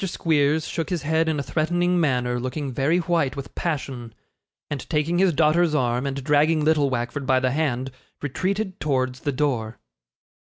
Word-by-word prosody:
Squeers 155 -4 +1
shook 165 - -3
his 175 -5 -2
head 160 +2 +1
in 155 -2 0
a - - -2
threatening 175 +5 +1
manner, 125 -5 +1
looking 130 +3 -3
very 140 +7 +1
white 165 -6 0
with 140 -1 -7
passion; 130 -8 -4 0.5
and 145 -2 -5
taking 165 +2 +1
his 190 -1 +4
daughter's 155 +2 +3
arm, 125 -1 0
and 135 0 -4
dragging 150 +2 +3
little 150 -3 +3
Wackford 130 +2 -3
by 130 -1 +4
the 130 0 0
hand, 135 -3 -1 0.3
retreated 190 +7 -2
towards 130 -3 -1
the 145 - -2
door. 125 -5 -1
145 Hz, 165 wpm, -24 LUFS, 130-160 Hz, 0.5 s, his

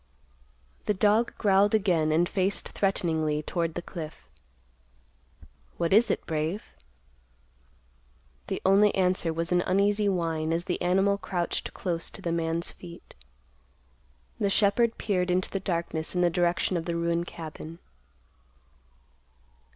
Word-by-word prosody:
The 210 - +2
dog 215 +4 +2
growled 205 0 +4
again 175 -7 +2
and 170 +3 +3
faced 195 +1 0
threateningly 160 -6 0
toward 165 0 -2
the 175 - -4
cliff. 155 -3 -8 1.5
"What 170 +1 0
is 225 +4 +5
it, - - -1
Brave?" 160 +6 -2 1.8
The - - -4
only 200 +2 +5
answer 180 -3 +1
was 165 +2 -2
an 180 0 +3
uneasy 200 +3 +2
whine 165 -3 -1
as 170 +1 -1
the 180 -1 -3
animal 195 +3 +2
crouched 180 -2 -3
close 170 -3 -2
to - - -11
the 170 - -1
man's 165 0 -1
feet. 170 -1 -13 1.3
The 200 - +1
shepherd 220 +3 +2
peered 185 -4 0
into 180 +1 0
the 195 - -1
darkness 170 -3 -3
in 180 - +2
the 175 -1 +3
direction 175 +2 +1
of 165 - -4
the 170 - -2
ruined 170 0 0
cabin. 160 0 -8
175 Hz, 130 wpm, -27 LUFS, 165-195 Hz, 1.8 s, is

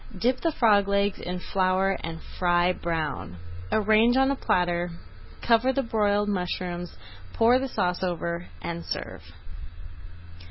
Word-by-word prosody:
Dip 250 +7 +1
the 330 - +1
frog 210 -7 +3
legs 200 0 +1
in 180 +1 -4
flour 185 +1 +1
and 165 0 -6
fry 175 0 +1
brown. 155 - -4 0.3
Arrange 220 +3 +4
on 265 +1 +4
a - - 0
platter, 175 -6 0 0.5
cover 235 +2 +3
with 265 -3 -3
broiled 205 -1 +2
mushrooms, 180 -2 -3 0.4
pour 240 +3 +4
the 270 - -2
sauce 180 -7 -1
over, 170 -1 -3 0.2
and 170 0 -4
serve. - - -5
190 Hz, 130 wpm, -26 LUFS, 175-225 Hz, 0.5 s, Arrange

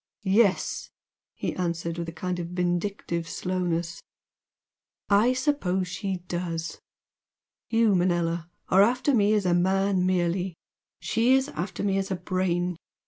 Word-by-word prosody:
"Yes" 200 0 +2 0.5
he - - -3
answered 170 -1 -2
with 170 -1 -3
a - - -5
kind 180 +2 -3
of 170 - -3
vindictive 175 -1 -2
slowness 175 -2 -2 1.1
"I 215 +5 +5
suppose 190 -10 0
she 185 -1 -4
does! 170 -1 -3 0.9
You, 225 -2 +3
Manella, 175 -2 +1 0.2
are 190 - +6
after 250 +6 +3
me 210 -2 +4
as 205 -2 +1
a 180 - +3
man 190 +1 +2
merely 180 0 0 0.5
she 240 +3 +3
is 265 +2 +1
after 180 -5 -4
me 195 -1 +1
as 195 - -3
a 190 - 0
Brain! 180 -1 -1
180 Hz, 135 wpm, -26 LUFS, 175-200 Hz, 1.1 s, are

